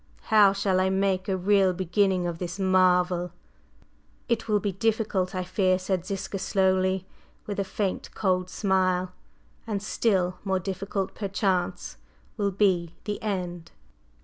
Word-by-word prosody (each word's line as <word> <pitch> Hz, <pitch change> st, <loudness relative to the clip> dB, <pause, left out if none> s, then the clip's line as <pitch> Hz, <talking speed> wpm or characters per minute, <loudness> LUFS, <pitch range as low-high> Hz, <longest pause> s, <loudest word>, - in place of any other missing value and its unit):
How 205 Hz, -2 st, +7 dB
shall 195 Hz, -1 st, +1 dB
I 190 Hz, 0 st, +2 dB
make 190 Hz, 0 st, 0 dB
a 190 Hz, -, +1 dB
real 190 Hz, 0 st, +3 dB
beginning 185 Hz, 0 st, +1 dB
of 170 Hz, -1 st, -3 dB
this 180 Hz, +1 st, -4 dB
marvel?" 180 Hz, -2 st, +2 dB, 1.0 s
"It 230 Hz, -1 st, -1 dB
will 210 Hz, -1 st, +2 dB
be 205 Hz, 0 st, -1 dB
difficult, 205 Hz, -2 st, 0 dB
I 185 Hz, -, -1 dB
fear," 185 Hz, 0 st, +1 dB
said 185 Hz, -1 st, -2 dB
Ziska 195 Hz, 0 st, -4 dB
slowly, 190 Hz, -1 st, +1 dB, 0.4 s
with 205 Hz, -1 st, -4 dB
a -, -, +2 dB
faint, 190 Hz, 0 st, -3 dB
cold 185 Hz, -3 st, 0 dB
smile; 185 Hz, -2 st, +1 dB, 0.6 s
"and 210 Hz, -3 st, -1 dB
still 195 Hz, -3 st, 0 dB
more 190 Hz, -1 st, 0 dB
difficult, 195 Hz, +1 st, -3 dB
perchance, 190 Hz, -3 st, -2 dB, 0.4 s
will 205 Hz, -3 st, 0 dB
be 185 Hz, -4 st, +1 dB
the 210 Hz, -1 st, -4 dB
end!" 180 Hz, -5 st, -3 dB
190 Hz, 140 wpm, -26 LUFS, 185-200 Hz, 1.0 s, How